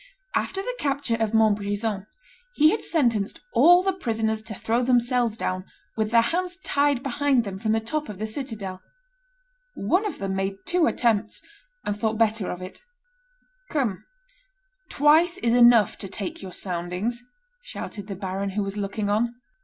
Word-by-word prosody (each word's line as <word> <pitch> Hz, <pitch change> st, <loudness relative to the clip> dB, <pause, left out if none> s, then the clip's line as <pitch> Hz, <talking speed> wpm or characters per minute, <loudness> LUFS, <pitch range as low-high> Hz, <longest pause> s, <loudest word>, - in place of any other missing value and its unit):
After 390 Hz, 0 st, -1 dB
the -, -, -4 dB
capture 280 Hz, -4 st, -1 dB
of 225 Hz, -1 st, 0 dB
Montbrison, 205 Hz, -1 st, +1 dB, 0.5 s
he 305 Hz, +2 st, +6 dB
had 435 Hz, -, -1 dB
sentenced 235 Hz, -, 0 dB
all 355 Hz, +1 st, +7 dB
the 385 Hz, 0 st, +1 dB
prisoners 220 Hz, -9 st, -1 dB
to 220 Hz, -1 st, -6 dB
throw 230 Hz, +5 st, 0 dB
themselves 245 Hz, -2 st, +2 dB
down, 185 Hz, -3 st, -2 dB, 0.3 s
with 220 Hz, -1 st, 0 dB
their 230 Hz, 0 st, +5 dB
hands 360 Hz, +7 st, -2 dB
tied 285 Hz, -2 st, +2 dB
behind 275 Hz, -1 st, +2 dB
them, 195 Hz, -3 st, -6 dB
from 220 Hz, +1 st, 0 dB
the 225 Hz, -, +2 dB
top 295 Hz, +7 st, -3 dB
of 205 Hz, -, -7 dB
the 215 Hz, -, -3 dB
citadel; 215 Hz, -6 st, -5 dB, 0.9 s
one 355 Hz, -, +1 dB
of 380 Hz, -, -5 dB
them 195 Hz, -1 st, -3 dB
made 195 Hz, 0 st, -1 dB
two 350 Hz, -2 st, +2 dB
attempts, 220 Hz, -3 st, 0 dB, 0.4 s
and 205 Hz, -, -1 dB
thought 220 Hz, +1 st, -1 dB
better 220 Hz, -3 st, +1 dB
of 180 Hz, +1 st, -5 dB
it; 185 Hz, -, -10 dB, 0.9 s
"Come, 245 Hz, -, -1 dB, 0.9 s
twice 320 Hz, +5 st, +4 dB
is 235 Hz, -10 st, +1 dB
enough 235 Hz, -4 st, +6 dB
to 195 Hz, -, -5 dB
take 195 Hz, 0 st, -6 dB
your 190 Hz, -2 st, -7 dB
soundings," 180 Hz, +7 st, -3 dB, 0.4 s
shouted 210 Hz, -, -7 dB
the 200 Hz, -, -5 dB
baron, 195 Hz, +1 st, -3 dB
who 200 Hz, +2 st, -1 dB
was 195 Hz, +1 st, -4 dB
looking 205 Hz, +1 st, -2 dB
on. 230 Hz, +4 st, +1 dB
225 Hz, 160 wpm, -25 LUFS, 200-275 Hz, 0.9 s, all